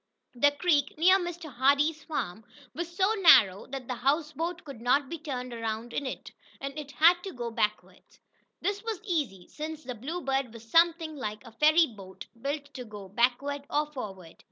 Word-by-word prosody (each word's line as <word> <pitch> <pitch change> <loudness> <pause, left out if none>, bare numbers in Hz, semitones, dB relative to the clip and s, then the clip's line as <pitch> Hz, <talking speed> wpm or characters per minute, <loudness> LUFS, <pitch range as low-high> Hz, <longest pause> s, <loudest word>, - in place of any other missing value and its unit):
The 260 +4 +4
creek, 290 -1 +1
near 370 +4 +6
Mr. 345 -4 -6
Hardee's 285 +5 +2
farm, 225 - -4 0.3
was 345 +1 -4
so 380 +4 +2
narrow 205 - +6
that 265 -1 -6
the 255 - -2
houseboat 305 +6 -1
could 275 -6 -10
not 260 +3 +2
be 335 - -5
turned 255 -5 -5
around 230 +1 -4
in 280 - -2
it, - - -6 0.3
and 275 0 -5
it 300 -2 -6
had 345 +4 +5
to 390 - -5
go 240 -6 -5
backward. 215 -1 -2 0.6
This 405 +2 -1
was 450 -4 -3
easy, 290 - -2
since 310 0 -6
the 250 -1 -5
Bluebird 270 0 -2
was 230 0 -12
something 330 +2 +3
like 215 -4 -5
a 230 - -11
ferry 310 +8 +5
boat, 195 -7 -11 0.2
built 285 +1 -4
to 255 - -6
go 210 -4 -10
backward 275 +6 0
or 300 0 0
forward. 190 - -8
280 Hz, 180 wpm, -29 LUFS, 235-320 Hz, 0.6 s, near